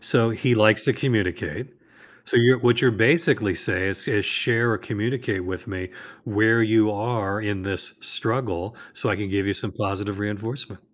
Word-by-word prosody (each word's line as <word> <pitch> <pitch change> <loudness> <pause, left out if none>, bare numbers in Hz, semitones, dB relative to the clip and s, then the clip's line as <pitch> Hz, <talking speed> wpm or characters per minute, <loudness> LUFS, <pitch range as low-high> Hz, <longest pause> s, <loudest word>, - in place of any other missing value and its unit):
so 115 -1 +3
he 120 +2 +1
likes 105 -1 +4
to - - +3
communicate. 110 - -2 0.5
So - - 0
you're 125 +2 +5
what 120 0 +3
you're 125 -3 +4
basically 110 - +3
say 95 +3 +1
is 95 - -1
is, 105 -2 0
"Share 120 +4 +2
or 110 - 0
communicate 110 -3 -3
with 90 -1 -6
me 95 -2 -6 0.3
where 110 +2 +2
you 110 -1 +3
are 105 -2 -2
in 105 -3 -3
this 95 -1 -3
struggle 110 -4 -2 0.2
so - - -3
I - - 0
can 105 -1 -5
give 100 0 -1
you 100 - 0
some 105 -6 -1
positive 100 0 -4
reinforcement." 105 +1 -5
105 Hz, 175 wpm, -23 LUFS, 100-115 Hz, 0.5 s, you're